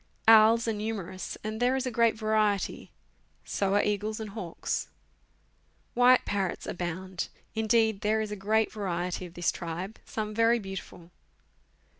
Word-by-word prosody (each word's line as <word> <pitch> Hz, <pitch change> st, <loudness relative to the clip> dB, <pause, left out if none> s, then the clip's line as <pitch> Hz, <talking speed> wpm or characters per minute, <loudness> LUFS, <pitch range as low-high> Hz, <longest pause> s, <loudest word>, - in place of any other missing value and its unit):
Owls 225 Hz, +1 st, +7 dB
are 225 Hz, -, +1 dB
numerous, 205 Hz, -4 st, -4 dB
and 215 Hz, +1 st, -4 dB
there 250 Hz, +2 st, +3 dB
is 265 Hz, 0 st, -1 dB
a 255 Hz, -, -2 dB
great 230 Hz, -1 st, +3 dB
variety; 215 Hz, -2 st, 0 dB, 0.6 s
so 195 Hz, 0 st, 0 dB
are 205 Hz, -, +4 dB
eagles 210 Hz, +1 st, -1 dB
and 215 Hz, -2 st, -6 dB
hawks. 190 Hz, -6 st, -3 dB, 1.1 s
White 250 Hz, +1 st, +5 dB
parrots 195 Hz, -3 st, -2 dB
abound. 180 Hz, +1 st, -4 dB, 0.3 s
Indeed, 220 Hz, -1 st, +2 dB
there 215 Hz, +1 st, +2 dB
is 215 Hz, -1 st, -3 dB
a -, -, -2 dB
great 215 Hz, +2 st, +1 dB
variety 180 Hz, -3 st, -3 dB
of 170 Hz, -, -17 dB
this 175 Hz, -, +1 dB
tribe, 175 Hz, +5 st, -6 dB
some 215 Hz, -1 st, -4 dB
very 230 Hz, +2 st, +4 dB
beautiful. 195 Hz, -4 st, -8 dB
210 Hz, 145 wpm, -28 LUFS, 190-220 Hz, 1.1 s, Owls